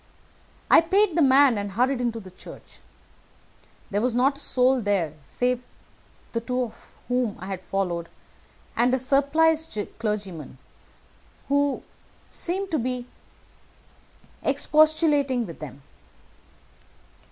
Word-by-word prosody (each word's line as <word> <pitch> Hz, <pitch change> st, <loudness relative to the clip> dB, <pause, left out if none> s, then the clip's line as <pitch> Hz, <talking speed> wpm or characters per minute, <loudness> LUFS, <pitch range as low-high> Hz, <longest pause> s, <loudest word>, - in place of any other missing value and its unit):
I -, -, +9 dB
paid 375 Hz, +1 st, +2 dB
the 340 Hz, -, +3 dB
man, 270 Hz, -4 st, +5 dB
and 200 Hz, -1 st, -5 dB
hurried 250 Hz, +4 st, +1 dB
into 235 Hz, -2 st, -1 dB
the 190 Hz, -3 st, -12 dB
church. 185 Hz, -, -13 dB, 1.1 s
There 205 Hz, +1 st, 0 dB
was 245 Hz, 0 st, 0 dB
not 270 Hz, +3 st, +2 dB
a -, -, -8 dB
soul 255 Hz, -1 st, +2 dB
there 195 Hz, -8 st, 0 dB
save 250 Hz, -, -1 dB, 0.7 s
the 230 Hz, -, -1 dB
two 250 Hz, 0 st, -2 dB, 0.4 s
whom 245 Hz, -4 st, 0 dB
I 185 Hz, -, -9 dB
had 190 Hz, -1 st, -5 dB
followed, 175 Hz, -3 st, -2 dB, 0.7 s
and 245 Hz, +2 st, +3 dB
a -, -, +1 dB
surpliced 285 Hz, +2 st, +2 dB, 0.2 s
clergyman, 200 Hz, -, -4 dB, 0.9 s
who 285 Hz, 0 st, +1 dB, 0.5 s
seemed 380 Hz, +2 st, -3 dB
to 315 Hz, -, +1 dB
be 250 Hz, 0 st, -3 dB, 1.4 s
expostulating 300 Hz, -5 st, +3 dB
with 165 Hz, -4 st, -10 dB
them. 140 Hz, -2 st, -9 dB
250 Hz, 115 wpm, -25 LUFS, 205-285 Hz, 1.4 s, I